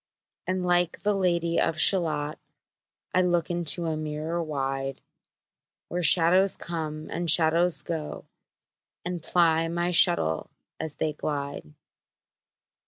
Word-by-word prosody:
And 185 -1 -1
like 175 -1 0
the 210 0 +2
Lady 170 -3 0
of 160 - -1
Shalott 155 -5 +2 0.7
I 185 - +3
look 175 -2 0
into 170 -1 +2
a 160 -1 -1
mirror 155 +2 -4
wide, 135 -3 -3 0.9
Where 180 - -2
shadows 180 +3 +4
come, 155 -2 -5
and 170 0 -2
shadows 165 +2 +2
go, 160 -3 -5 0.8
And 175 -1 -4
ply 165 -1 +2
my 170 +1 -2
shuttle 165 - +3 0.3
as 155 -2 -5
they 155 -1 -2
glide. 140 - -5
165 Hz, 115 wpm, -26 LUFS, 155-175 Hz, 0.9 s, shadows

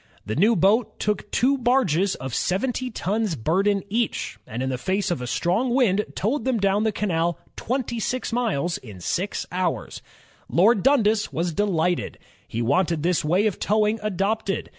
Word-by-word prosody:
The 110 - -3
new 215 +7 +4
boat 205 +6 +2
took 210 0 -1
two 270 +2 +2
barges 200 - +2
of 130 -2 -6
seventy 250 - -1
tons 215 -3 -1
burden 195 - +1
each, 215 - -2
and 120 +4 -4
in 130 - -1
the 130 -1 -3
face 190 +7 -1
of 170 - -2
a 125 - -4
strong 220 - 0
wind 210 -6 +3
toWed 245 +9 -1
them 260 -2 +1
down 200 +1 +1
the 220 - +2
canal 175 -5 0 0.2
twenty 240 -2 -2 0.3
miles 195 - 0
in 105 -7 -11
six 185 - -2
hours. 180 -1 -2 0.5
Lord 200 +4 +4
Dimdas 220 -6 +3
was 170 +1 -2
delighted. 180 -3 0 0.3
He 115 +1 -3
wanted 165 +4 +1
this 175 0 +1
way 180 +7 +2
of 210 - -1
towing 215 +1 +1
adopted. 200 0 -1
200 Hz, 160 wpm, -24 LUFS, 170-225 Hz, 0.5 s, new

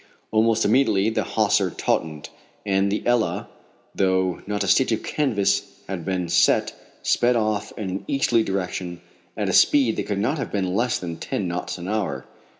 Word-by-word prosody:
Almost 110 0 +3
immediately 110 -3 +3
the - - 0
hawser - - +1
tautened, 75 -2 -2 0.4
and 100 0 +1
the 105 - -2
Ebba, 120 -2 +1 0.5
though 95 -2 +1
not 105 0 -1
a - - -3
stitch - - +3
of - - -1
canvas 105 -10 0
had 90 -3 -4
been 90 -1 -2
set, 85 - +3 0.3
sped 120 0 +2
off 110 -2 -1
in 105 - -4
an 95 - -5
easterly 125 -4 +2
direction 90 -3 -3 0.4
at - - -1
a - - 0
speed 130 -6 +4
that - - -3
could 100 - -1
not 130 +10 0
have - - -4
been 95 -3 -1
less 120 +4 +1
than 85 -2 -6
ten 95 +2 -3
knots 90 +1 -4
an 90 0 -7
hour. 105 -1 -2
100 Hz, 175 wpm, -23 LUFS, 95-115 Hz, 0.5 s, speed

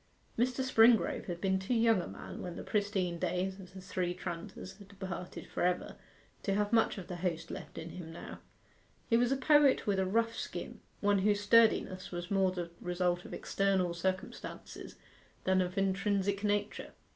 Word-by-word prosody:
Mr. 250 +2 +1
Springrove 230 -3 +4
had 175 -2 -4
been 190 0 +1
too 190 +6 -1
young 225 -4 +4
a - - -6
man - - -8
when 180 -1 -5
the - - -6
pristine 195 -5 -1
days 190 +3 -1
of 190 0 -12
the - - -7
Three 180 -1 -2
Tranters 185 +2 -7
had 200 - -13
departed 190 -2 -7
for - - -5
ever 180 0 0 0.5
to 195 - 0
have 210 +2 0
much 225 -1 +3
of 190 - -6
the 180 - -6
host 165 -2 -2
left - - -8
in 165 0 -6
him 165 -1 -8
now. 165 - -9 0.7
He - - +6
was 245 +1 +2
a 270 - +2
poet 290 0 +5
with 200 -2 +1
a 190 - +2
rough 230 +3 +1
skin: - - -6 0.2
one 205 -1 +3
whose 205 +1 +2
sturdiness 205 -3 +4
was 175 +1 -5
more 190 -2 +3
the 175 -2 -5
result 180 0 0
of - - -9
external 190 -3 +1
circumstances 185 +2 -4 0.5
than 185 0 +3
of 180 +2 -3
intrinsic 195 +1 +1
nature. 205 0 -1
190 Hz, 180 wpm, -32 LUFS, 180-210 Hz, 0.7 s, He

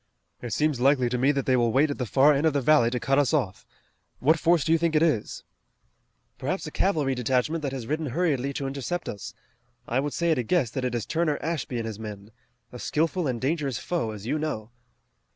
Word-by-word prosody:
It 120 - -6
seems 150 +1 +1
likely 130 -1 +3
to 125 - -1
me 135 +3 +4
that 140 -2 -2
they 130 - +3
will 120 -2 +2
wait 145 +5 +3
at 145 - -5
the 125 - -2
far 140 +6 +5
end 145 +3 +2
of 155 - +1
the 140 - +2
valley 140 -3 +4
to 125 0 -2
cut 135 +3 +2
us 145 +2 +2
off. 100 -11 -2 0.5
What 155 +5 +3
force 170 -2 +3
do 160 - +1
you 165 - +4
think 165 -1 0
it 155 - +4
is?" 150 -11 0 1.0
"Perhaps - - -2
a - - -6
cavalry 155 -8 +1
detachment 130 +6 0
that 140 -3 -2
has 130 -4 -5
ridden 155 +4 -2
hurriedly 140 -2 0
to 140 - -3
intercept 140 +6 -3
us. 100 0 -6 0.5
I 125 - 0
would 145 +1 -2
say 170 -1 +1
at 155 - +2
a - - 0
guess 130 -2 +1
that 130 - -3
it 125 -1 -1
is 115 - -2
Turner 160 -3 0
Ashby 155 -6 -3
and 115 - -3
his 110 -2 -6
men. 105 -1 -8 0.4
A 125 - -9
skillful 165 +4 0
and 125 -3 -2
dangerous 140 -2 -1
foe, 170 -10 -2
as 105 -1 -7
you 150 +6 -1
know." 115 -8 -4
135 Hz, 235 wpm, -26 LUFS, 120-155 Hz, 1.0 s, far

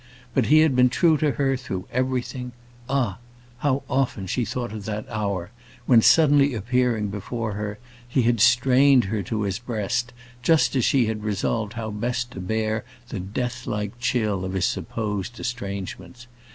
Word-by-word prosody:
But 130 -3 +2
he 155 +1 +6
had 155 -4 +3
been 125 0 +5
true 160 +6 +3
to 150 -2 +2
her 135 -1 +1
through 95 -8 -5
everything. 125 0 -2 0.4
Ah! 125 -7 0 0.4
how 140 -1 0
often 125 -7 0
she 120 +7 -1
thought 120 -2 -4
of 105 -2 -7
that 105 0 -4
hour, 100 -5 -3 0.3
when 120 -3 +6
suddenly 145 -2 +5
appearing 115 -1 0
before 110 +2 -4
her, 105 0 -4 0.3
he 125 +1 +1
had 115 -2 +2
strained 125 +2 +5
her 105 +1 -2
to 105 +3 -2
his 100 0 -2
breast, 120 +1 -2 0.3
just 155 +3 +3
as 130 - +2
she 130 -4 +3
had 110 -1 -3
resolved 105 +1 -1
how 115 -2 -4
best 120 +3 -2
to 95 - -8
bear 110 +3 -1 0.3
the 105 - -4
death 120 +6 -4
like 105 +2 -3
chill 110 -6 0
of 95 0 -4
his 95 -1 +1
supposed 110 +1 -3
estrangements! 100 -1 -6
120 Hz, 165 wpm, -24 LUFS, 105-125 Hz, 0.4 s, he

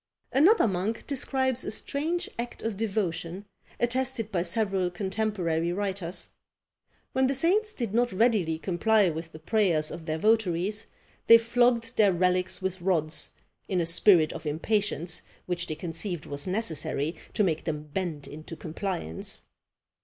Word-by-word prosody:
Another 320 - +5
monk 195 +3 -2
describes 260 -2 +1
a - - -3
strange 310 +9 -1
act 240 0 -5
of 225 -2 -2
devotion, 195 -3 -2 0.3
attested 240 -2 0
by 180 -4 +1
several 190 0 0
contemporary 180 -3 -1
writers. 190 -2 -3 0.8
When 260 0 +3
the 275 - 0
saints 395 +10 +2
did 235 - -4
not 240 +1 +2
readily 190 -6 +2
comply 195 +3 +2
with 160 +1 -6
the 155 - -10
prayers 165 -3 +1
of 165 0 -8
their 155 0 -1
votaries, 210 +1 +1 0.4
they 230 - +11
flogged 235 0 +2
their 205 -3 +6
relics 180 +1 +1
with 185 -1 -2
rods, 160 -4 0 0.4
in 185 - 0
a 170 - +1
spirit 165 -1 +5
of 160 -1 -7
impatience 175 +1 0 0.2
which 175 -1 -3
they 155 - -3
conceived 165 +1 -4
was 145 +4 -4
necessary 165 -6 -2 0.2
to 210 - +3
make 160 -5 0
them 150 -2 -2
bend 170 -7 -3
into 155 +2 -9
compliance. 165 - -5
190 Hz, 145 wpm, -28 LUFS, 165-225 Hz, 0.8 s, they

